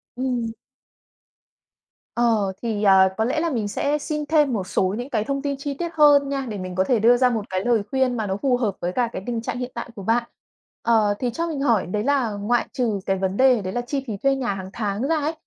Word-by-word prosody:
Ừm. 245 -3 -2 1.6
Ờ, 220 -5 +2
thì, 220 -3 -2
ờ, 190 -1 +6
có 220 - +1
lẽ 280 +6 0
là 335 0 0
mình 225 -7 -1
sẽ 285 +8 0
xin 300 0 -3
thêm 295 -4 +3
một 190 -4 -2
số 190 +2 0
những 245 +4 -5
cái 215 -5 0
thông 275 +1 -2
tin 280 -1 -2
chi 280 +1 -4
tiết 340 +4 -4
hơn 290 -2 +5
nha 275 -1 -2
để 210 - -4
mình 185 -1 -6
có 185 - +2
thể 235 +1 +1
đưa 240 +3 +5
ra 255 0 +4
một 220 -4 -2
cái 185 0 -2
lời 235 -3 +3
khuyên 260 -2 +1
mà 215 -2 -2
nó 190 +1 -2
phù 260 -3 +2
hợp 215 -6 -1
với 175 - -1
cả 235 +4 0
cái 185 - -5
tình 235 -2 -2
trạng 230 - -4
hiện 250 0 -4
tại 235 0 -5
của 200 - -8
bạn. 235 +3 +2 0.6
Ờ, 220 -3 +3
thì 250 - 0
cho 335 +7 -2
mình 295 -4 -3
hỏi 235 -8 +2
đấy 210 +4 -2
là 265 -4 +1
ngoại 210 +4 0
trừ 225 -6 0
cái 195 0 0
vấn 190 +1 -2
đề 255 -4 +5
đấy 185 0 -5
là 245 - -1
chi 270 +2 -3
phí 210 -3 -4
thuê 275 +5 +2
nhà 250 -6 -1
hằng 190 -1 -7
tháng 210 +3 -2
ra 325 - +2
ấy, 305 +2 -1
240 Hz, 255 wpm, -23 LUFS, 205-275 Hz, 1.6 s, ờ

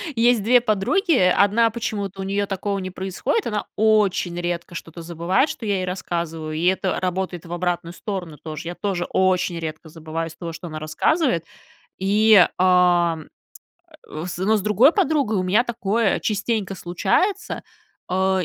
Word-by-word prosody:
есть 230 -2 +3
2 245 +2 +5
подруги, 245 - +1
1 205 +2 +4
почему-то 205 -4 -4
у - - -3
нее 200 +1 -1
такого 200 +1 -3
не 185 0 -5
происходит, 190 - -2
она 210 -2 -2
очень 205 -5 +2
редко 175 0 -4
что-то 165 +1 -8
забывает, 170 - 0
что 230 - -6
я 200 -1 +1
ей 185 - -2
рассказываю, 170 -4 -4
и 160 +3 -2
это 190 0 +1
работает 180 -2 -3
в 170 - -7
обратную 175 -1 -2
сторону 180 -7 -5
тоже, 155 +2 -7
я 175 - -5
тоже 190 -4 -2
очень 185 -2 +1
редко 160 0 -6
забываю 165 +1 -5
из 160 - -13
того, 170 -2 -6
что 165 +2 -8
она 155 -1 -6
рассказывает, 170 - 0 0.5
и, 205 0 +5
а, 180 -2 +4 0.9
э, 155 +2 -6
с 175 - -5
но 205 +4 +2
с - - -2
другой 215 - +5
подругой 285 - +1
у 185 - 0
меня 205 +7 +3
такое 225 -2 0
частенько 205 -1 -1
случается, 285 - -1 0.4
а, 190 0 +1
190 Hz, 165 wpm, -22 LUFS, 175-215 Hz, 0.9 s, 2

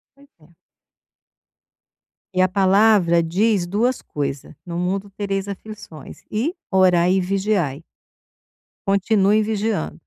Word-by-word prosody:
Pois 280 0 -21
é. 155 +3 -22 1.8
E 185 - +1
a 185 - +4
palavra 195 -2 +3
diz 190 +3 +1
2 230 +8 0
coisa: 140 0 -5
"No 170 -1 -5
mundo 195 +3 -2
tereis 195 -1 -3
aflições" 200 -7 -10
e 265 - -1 0.2
"orai 180 -2 +4
e 190 - +2
vigiai". 185 -6 -1 1.0
Continue 200 +1 +2
vigiando. 210 - -2
195 Hz, 105 wpm, -21 LUFS, 175-210 Hz, 1.8 s, a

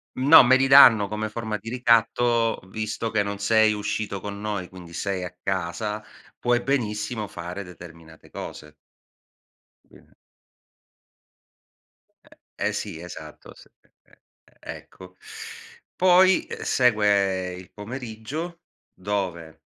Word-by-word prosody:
No, 140 +3 +8
me 130 +2 +5
li 135 +1 +3
danno 115 -7 +8
come 105 +1 -4
forma 110 -1 -4
di 110 +3 -9
ricatto: 115 -1 +2
"Visto 110 +1 -4
che 110 -2 +1
non 100 0 -3
sei 110 +1 +3
uscito 105 -1 -3
con 100 +1 -7
noi, 100 -4 -3
quindi 90 -2 -13
sei 95 -1 -3
a 90 0 -7
casa, 95 +3 -3 0.4
puoi 120 0 +1
benissimo 105 -4 -2
fare 90 +3 -7
determinate 85 -2 -14
cose." 75 0 -9 1.1
Quindi - - -20 2.5
E - - +1
eh - - -2
sì, 80 - -5
esatto, 80 -3 -11
s - - -17 0.2
e - - -33
e - - -26 0.5
e - - -7
ecco. 90 0 -15 0.8
Poi, 185 +1 +4
uhm, - - -7
segue 100 -6 +2
il 90 0 -12
pomeriggio, 130 +9 -7 0.3
dove 90 -5 -4
105 Hz, 120 wpm, -24 LUFS, 95-115 Hz, 2.5 s, No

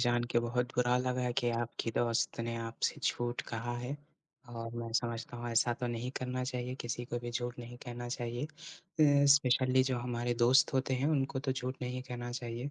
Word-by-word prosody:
जान 120 0 +3
के - - +5
बहुत 120 +1 0
बुरा 125 0 +3
लगा 125 -1 0
कि 120 -2 +1
आपकी 115 0 -2
दोस्त 115 0 +1
ने 115 0 -2
आपसे 115 0 -2
झूठ 120 0 0
कहा 120 +1 -3
है 125 +4 -3 0.5
और 115 -1 -6
मैं 115 -1 -4
समझता 115 0 -1
हूँ, 120 0 -4
ऐसा 115 +1 +3
तो 125 - 0
नहीं 120 +1 -2
करना 125 0 -2
चाहिए 125 0 -3
किसी 120 +1 -3
को 120 0 -3
भी 120 - -3
झूठ 120 0 -3
नहीं 120 0 -8
कहना 120 0 -5
चाहिए। 120 +1 -2
अ, 150 -2 +1
स्पेशली 130 -2 +4
जो 130 -1 0
हमारे 120 0 -1
दोस्त 120 +3 +5
होते 130 0 +2
हैं, 130 +3 +1
उनको 135 -3 +1
तो 135 0 0
झूठ 130 0 -3
नहीं 125 +1 -2
कहना 120 -1 -5
चाहिए। 120 +2 -4
120 Hz, 200 wpm, -33 LUFS, 120-130 Hz, 0.5 s, के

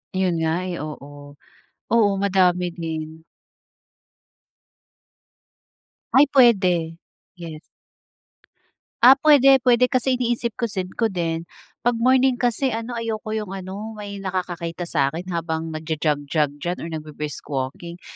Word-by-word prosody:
Yun 185 -2 +1
nga, 160 +3 0
eh, 175 -2 -4
oo. 145 -1 -9 0.5
Oo, 225 -3 +4
madami 180 -2 +2
din. 160 -1 -6 2.9
Ay, 275 +3 +7
puwede. 185 -11 +3 0.4
Yes. 165 -3 -8 1.4
Ah, 255 +2 +10
puwede. 275 -2 +5
Puwede, 250 0 +4
kasi 255 0 +1
iniisip-isip 230 -5 -2
ko 230 - +2
din, 170 -4 -2 0.4
'pag 240 - +4
morning 260 +1 +4
kasi 245 +1 0
ano, 230 +1 -4
ayoko 220 -2 -4
yung 215 -3 -3
ano, 195 +4 -6
may 205 -1 -7
nakakakita 175 -3 -4
sa'kin 160 +5 -1
habang 165 -1 -3
nagja-jog-jog 150 -2 -1
diyan 175 +4 -3
or 165 - -5
nagbri-brisk 150 -2 -6
walking. 145 +6 -5
180 Hz, 110 wpm, -22 LUFS, 160-230 Hz, 2.9 s, Ah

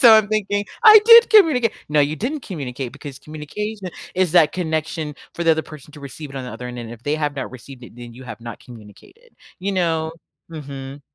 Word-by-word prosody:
So 235 -5 +9
I'm 215 -1 +4
thinking, 205 -1 -1 0.2
"I 435 0 +11
did 465 +1 +8
communica" 305 - +5 0.2
No, 150 0 +2
you 145 +2 0
didn't 285 +7 -3
communicate 135 - -6
because 145 -2 -10
communication 185 +8 -6 0.3
is 185 -3 +1
that 165 -4 +5
connection 160 -3 -3 0.2
for 170 - -4
the 165 - +5
other 160 0 -1
person 150 -1 -13
to 150 - -13
receive 140 +1 -9
it 135 - -9
on 130 - -5
the 125 - -7
other 125 0 -7
end, 125 0 -8
and 115 -1 -7
if 120 0 -11
they 145 - -1
have 150 -2 -2
not - - -4
received 130 +1 -12
it, 120 - -14
then 120 -1 -10
you 130 +2 -12
have 115 -2 -9
not 115 -1 -8
communicated, 120 - -16 0.2
you 195 +2 -3
know? 165 -4 -1 0.4
Mhm. 140 -3 -8
155 Hz, 220 wpm, -20 LUFS, 135-200 Hz, 0.4 s, I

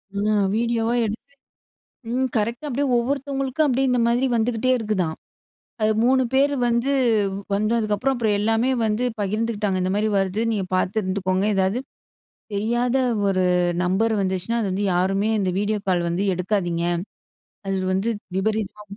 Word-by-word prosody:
ஆ 210 +2 +1 0.2
வீடியோவா 230 0 0
எடுத்து, 225 +6 -6 0.8
ம் 260 +2 0
கரெக்ட்டா 235 +7 -2
அப்டியே 280 +2 0
ஒவ்வொருத்தவங்களுக்கா, 275 +3 -1
அப்டியே 265 0 +1
இந்த 250 - +2
மாரி 245 +3 +2
வந்துகிட்டே 235 +2 +1
இருக்குதாம். 195 -8 -1 0.7
அது 215 0 +3
3 260 +1 +4
பேர் 275 +2 +3
வந்து 235 +3 +1 0.6
வந்ததுக்கப்புறம், 215 +4 +1
அப்புறம், 220 -3 +1
எல்லாமே 225 +4 +1
வந்து 220 +3 0 0.2
பகிர்ந்துகிட்டாங்க. 210 -1 -1
இந்த 185 +1 0
மாரி 215 +1 +1
வருது. 195 +2 -1
நீங்க 205 -3 -1
பார்த்து 185 +4 0
இருந்துக்கோங்க. 185 0 -1
ஏதாவது 190 +5 +1 0.7
தெரியாத 240 +5 0 0.3
1 185 -2 +2 0.4
நம்பர் 215 +5 +1
வந்துச்சுனா, 190 +4 -1
அது 205 -4 -1
வந்து 195 +2 -1
யாருமே 195 +4 +1
இந்த 190 -2 0
வீடியோ 210 +1 0
கால் 175 -2 +1
வந்து 175 +4 -1
எடுக்காதீங்க. 175 -2 -1 0.8
அது 195 0 0 0.2
வந்து 195 +4 0 0.3
விபரீதமா 210 +1 -2
215 Hz, 135 wpm, -23 LUFS, 195-240 Hz, 0.8 s, 3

